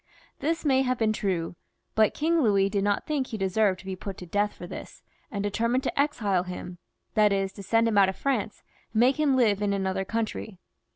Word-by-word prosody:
This 325 Hz, +2 st, -1 dB
may 265 Hz, -2 st, +4 dB
have 255 Hz, -1 st, 0 dB
been 220 Hz, -2 st, +2 dB
true, 180 Hz, -5 st, -2 dB, 0.4 s
but 220 Hz, -1 st, +3 dB
King 330 Hz, +2 st, +2 dB
Louis 200 Hz, -5 st, +3 dB
did 200 Hz, -1 st, 0 dB
not 205 Hz, 0 st, 0 dB
think 285 Hz, -4 st, -1 dB
he 220 Hz, -, -5 dB
deserved 195 Hz, 0 st, +1 dB
to -, -, -19 dB
be 190 Hz, -1 st, -4 dB
put 195 Hz, +1 st, -7 dB
to 180 Hz, -, -8 dB
death 205 Hz, +4 st, 0 dB
for -, -, -8 dB
this, -, -, -9 dB, 0.3 s
and 205 Hz, -6 st, -3 dB
settled 230 Hz, +5 st, 0 dB
to 275 Hz, -, -2 dB
exile 225 Hz, -11 st, +1 dB
him, 180 Hz, -1 st, -7 dB, 0.3 s
that 210 Hz, -2 st, +4 dB
is, 195 Hz, -1 st, 0 dB
to 200 Hz, -, -9 dB
send 225 Hz, +4 st, +2 dB
him 210 Hz, -3 st, +3 dB
out 195 Hz, -1 st, +5 dB
of 190 Hz, -, -4 dB
France, 250 Hz, -6 st, -2 dB, 0.3 s
and 220 Hz, -, +1 dB
make 260 Hz, +5 st, +4 dB
him 290 Hz, -3 st, +3 dB
live 215 Hz, -6 st, +3 dB
in 205 Hz, -1 st, +1 dB
another 190 Hz, -1 st, -1 dB
country. 220 Hz, -1 st, -3 dB
210 Hz, 220 wpm, -27 LUFS, 195-245 Hz, 0.4 s, out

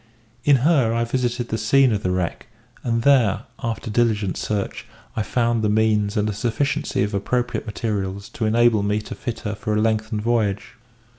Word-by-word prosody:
In 145 Hz, +1 st, +5 dB
her 140 Hz, -9 st, +4 dB
I 115 Hz, -, +1 dB
visited 120 Hz, 0 st, -1 dB
the 110 Hz, -, -2 dB
scene 130 Hz, +4 st, +4 dB
of 105 Hz, -2 st, 0 dB
the 95 Hz, -, -1 dB
wreck; 90 Hz, -2 st, -2 dB, 0.4 s
and 115 Hz, -1 st, 0 dB
there, 120 Hz, -7 st, +4 dB, 0.2 s
after 115 Hz, 0 st, -3 dB
diligent 110 Hz, -4 st, +1 dB
search, 105 Hz, -2 st, -3 dB, 0.3 s
I 110 Hz, -, 0 dB
found 115 Hz, +2 st, 0 dB
the 105 Hz, -, +1 dB
means 105 Hz, 0 st, +2 dB
and 105 Hz, 0 st, +1 dB
a 105 Hz, -, -1 dB
sufficiency 120 Hz, +1 st, -1 dB
of 105 Hz, +1 st, -2 dB
appropriate 120 Hz, +5 st, -1 dB
materials 100 Hz, -2 st, -3 dB
to 110 Hz, -, -3 dB
enable 115 Hz, -1 st, +4 dB
me 105 Hz, +1 st, 0 dB
to -, -, -7 dB
fit 115 Hz, -2 st, -5 dB
her 105 Hz, -, -3 dB
for 105 Hz, 0 st, -2 dB
a -, -, +2 dB
lengthened 110 Hz, 0 st, 0 dB
voyage. 110 Hz, -4 st, 0 dB
110 Hz, 180 wpm, -22 LUFS, 105-120 Hz, 0.4 s, In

